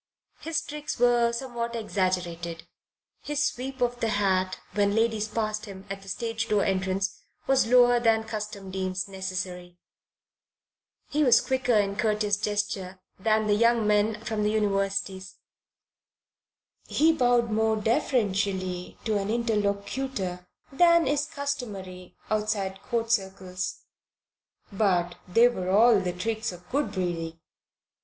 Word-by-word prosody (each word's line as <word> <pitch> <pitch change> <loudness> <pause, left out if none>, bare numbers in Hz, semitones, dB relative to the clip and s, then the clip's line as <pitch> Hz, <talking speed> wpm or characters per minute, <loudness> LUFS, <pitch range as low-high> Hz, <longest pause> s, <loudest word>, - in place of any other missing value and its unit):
His 320 0 -2
tricks 300 0 -5
were 240 -1 +4
somewhat 235 -1 -4
exaggerated; 180 -6 -2 0.5
his 295 0 0
sweep 260 +1 -4
of 245 0 0
the 230 - 0
hat 190 -3 +1 0.2
when 205 0 +2
ladies 225 -1 +1
passed 215 0 -2
him 195 -2 -10
at 195 0 -5
the 195 - -15
stage 225 +2 -2
door 205 -2 +2
entrance 190 0 -1 0.2
was 270 -3 +3
lower 245 0 +6
than 225 -1 +3
custom 210 -3 -6
deems 185 0 -2
necessary; 185 -2 -5 1.3
he 300 +1 +1
was 250 -4 +6
quicker 260 -2 +1
in 200 -1 +1
courteous 210 -1 +1
gesture 205 -3 -2 0.2
than 215 +2 +2
the 210 - +3
young 230 +1 +3
men 210 +1 +2
from 220 -1 -2
the 210 - +2
universities; 195 -2 -1 1.5
he 320 +2 +3
bowed 245 -5 +2
more 220 +1 +2
deferentially 200 -5 0
to 215 -2 +1
an 195 +1 -3
interlocutor 205 -3 -2 0.2
than 340 +3 +5
is 290 +2 0
customary 210 - -5 0.2
outside 210 -3 -1
Court 230 -2 -2
circles; 190 -3 -2 0.9
but 185 -4 +1
they 230 +7 +6
were 185 -7 -3
all 220 +3 +6
the 185 -2 -2
tricks 220 +5 -2
of 180 0 -13
good 285 +2 0
breeding. 165 -3 -3
210 Hz, 130 wpm, -27 LUFS, 190-235 Hz, 1.5 s, lower